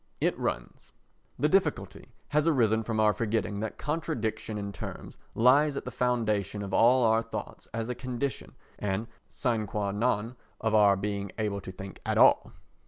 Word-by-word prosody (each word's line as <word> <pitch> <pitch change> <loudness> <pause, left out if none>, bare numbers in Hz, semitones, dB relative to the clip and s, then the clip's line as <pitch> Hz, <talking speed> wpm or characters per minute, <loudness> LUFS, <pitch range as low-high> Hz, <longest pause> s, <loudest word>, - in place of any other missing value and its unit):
It - - +1
runs: - - -4 0.4
The - - +2
difficulty - - 0 0.2
has 150 +2 +2
arisen 115 -8 +3
from 110 0 -2
our 105 -1 +4
forgetting 110 -2 -1
that 110 +1 -4
contradiction 115 -8 -3
in 100 -1 -4
terms - - -8 0.2
lies 140 +5 +4
at - - -5
the 125 - -5
foundation 110 -5 0
of 95 -1 -6
all 125 +4 +5
our 110 0 +4
thoughts - - -7
as 115 0 -3
a 125 - -2
condition 130 +2 -4 0.2
and 100 +2 -1 0.2
sine 115 -4 -1
qua 100 0 -2
non 115 +2 -1 0.2
of 110 0 -1
our 105 -2 +6
being 100 0 -3
able 105 -2 -2
to 95 - -8
think 95 +1 -9
at - - -1
all. - - +5
110 Hz, 170 wpm, -29 LUFS, 105-125 Hz, 0.4 s, our